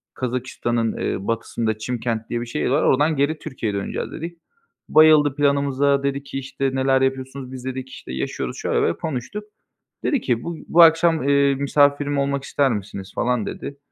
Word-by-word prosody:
Kazakistan'ın, 120 Hz, -2 st, -2 dB
eee, 95 Hz, -, -3 dB
batısında 115 Hz, -1 st, -1 dB
Çimkent 115 Hz, 0 st, -3 dB
diye 120 Hz, 0 st, -2 dB
bir -, -, -4 dB
şehir 115 Hz, -, -2 dB
var, 140 Hz, +4 st, +2 dB
oradan 150 Hz, +4 st, +3 dB
geri 150 Hz, +3 st, +1 dB
Türkiye'ye 110 Hz, -5 st, -4 dB
döneceğiz 100 Hz, -, -4 dB
dedik. 170 Hz, +1 st, -7 dB, 0.5 s
Bayıldı 155 Hz, -3 st, +6 dB
planımıza, 140 Hz, -1 st, +2 dB
dedi 140 Hz, 0 st, -1 dB
ki 135 Hz, -1 st, -5 dB
işte 135 Hz, 0 st, -2 dB
neler 130 Hz, 0 st, +2 dB
yapıyorsunuz, 135 Hz, 0 st, -2 dB
dedi. -, -, -10 dB
Biz 125 Hz, -1 st, -9 dB
dedik 130 Hz, 0 st, -5 dB
işte 65 Hz, -, -9 dB
yaşıyoruz, 65 Hz, -, -4 dB
şöyle -, -, -2 dB
böyle -, -, +3 dB
diye -, -, -1 dB
konuştuk. 160 Hz, +7 st, -4 dB, 0.6 s
Dedi 280 Hz, -6 st, +1 dB
ki, 120 Hz, -2 st, -1 dB
"Bu 170 Hz, -1 st, -5 dB
bu 170 Hz, -, +5 dB
akşam, 165 Hz, -3 st, +4 dB
eee, 140 Hz, -1 st, +4 dB
misafirim 145 Hz, +1 st, +2 dB
olmak 140 Hz, 0 st, 0 dB
ister 140 Hz, -1 st, +1 dB
misiniz?" 100 Hz, -2 st, -6 dB
falan 120 Hz, -3 st, 0 dB
dedi. 140 Hz, -, -6 dB
135 Hz, 175 wpm, -22 LUFS, 120-145 Hz, 0.6 s, Bayıldı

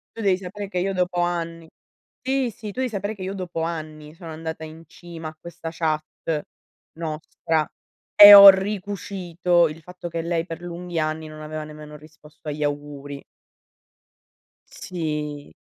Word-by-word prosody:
Tu 230 Hz, -, -6 dB
devi 195 Hz, -3 st, +3 dB
sapere 195 Hz, +2 st, -7 dB
che 185 Hz, -, -4 dB
io 190 Hz, +2 st, 0 dB
dopo 180 Hz, -1 st, 0 dB
anni 170 Hz, -1 st, -3 dB, 0.5 s
sì, 260 Hz, -1 st, 0 dB
sì. 220 Hz, 0 st, -10 dB
Tu 225 Hz, -, -8 dB
devi 260 Hz, -, 0 dB
sapere 205 Hz, 0 st, -4 dB
che 190 Hz, -, -8 dB
io 190 Hz, +1 st, -4 dB
dopo 180 Hz, -4 st, -5 dB
anni 155 Hz, -2 st, -6 dB
sono 165 Hz, 0 st, -11 dB
andata 160 Hz, 0 st, -6 dB
in 160 Hz, +1 st, -10 dB
cima 165 Hz, -1 st, -9 dB
a 155 Hz, -, -16 dB
questa 170 Hz, -1 st, -8 dB
chat 155 Hz, -2 st, -1 dB, 0.9 s
nostra 160 Hz, 0 st, -2 dB, 0.5 s
e 205 Hz, 0 st, +12 dB
ho 200 Hz, 0 st, +13 dB
ricucito 190 Hz, -3 st, +1 dB
il 155 Hz, +1 st, -9 dB
fatto 180 Hz, +1 st, -9 dB
che 165 Hz, 0 st, -3 dB
lei 165 Hz, 0 st, -1 dB
per 165 Hz, -1 st, -8 dB
lunghi 175 Hz, -1 st, -5 dB
anni 155 Hz, 0 st, -2 dB
non 155 Hz, 0 st, -10 dB
aveva 155 Hz, 0 st, -5 dB
nemmeno 150 Hz, 0 st, -10 dB
risposto 155 Hz, 0 st, -13 dB
agli 150 Hz, +1 st, -5 dB
auguri. 145 Hz, -1 st, -5 dB, 1.5 s
Sì. 150 Hz, -4 st, -5 dB
165 Hz, 155 wpm, -23 LUFS, 155-185 Hz, 1.5 s, ho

